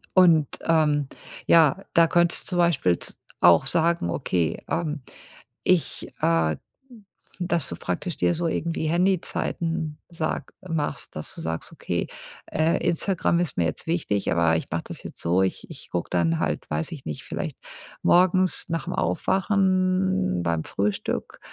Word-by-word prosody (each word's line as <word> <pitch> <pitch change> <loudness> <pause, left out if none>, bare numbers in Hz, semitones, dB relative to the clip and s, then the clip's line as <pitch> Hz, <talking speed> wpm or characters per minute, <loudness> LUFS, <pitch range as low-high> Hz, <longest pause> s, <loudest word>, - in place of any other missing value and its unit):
Und, 170 -5 +6 0.2
ähm, 150 -4 +2 0.4
ja, 170 +4 +5
da 165 0 +6
könntest 175 +1 +2
zum 180 - -1
Beispiel 140 - +3
z - - -6 0.2
auch 85 +9 +6
sagen: 165 - +2
„Okay, 85 -2 -1
ähm, 155 -4 -2 0.6
ich“, 180 -3 +1
äh, 80 -2 +2 0.9
dass 170 -4 0
du 85 - -4
praktisch 90 - -3
dir 175 - +2
so 170 0 0
irgendwie 165 0 -1
Handyzeiten 170 -3 0
sag 165 -2 -3
machst, 150 -7 -3
dass 75 - -5
du - - -9
sagst, 80 0 -4
okay, - - -3 0.4
äh, 160 +1 +1
Instagram 170 0 +1
ist 175 -5 -1
mir 85 - +3
jetzt 80 - -3
wichtig, 150 - 0
aber 85 -1 +3
ich - - -4
mach - - -1
das - - -7
jetzt - - -8
so, 90 +3 +2
ich 95 - -1
ich - - -10
guck 85 -1 -2
dann 85 -2 +1
halt- - - -2
weiß 75 +1 -1
ich 145 -5 -8
nicht- 75 - -5
vielleicht - - -5 0.5
morgens 185 +1 +4
nach 165 -4 -2
'm - - -2
Aufwachen 185 - +1
beim 85 -2 -1
Frühstück 100 +1 -2
160 Hz, 150 wpm, -25 LUFS, -, 0.9 s, Und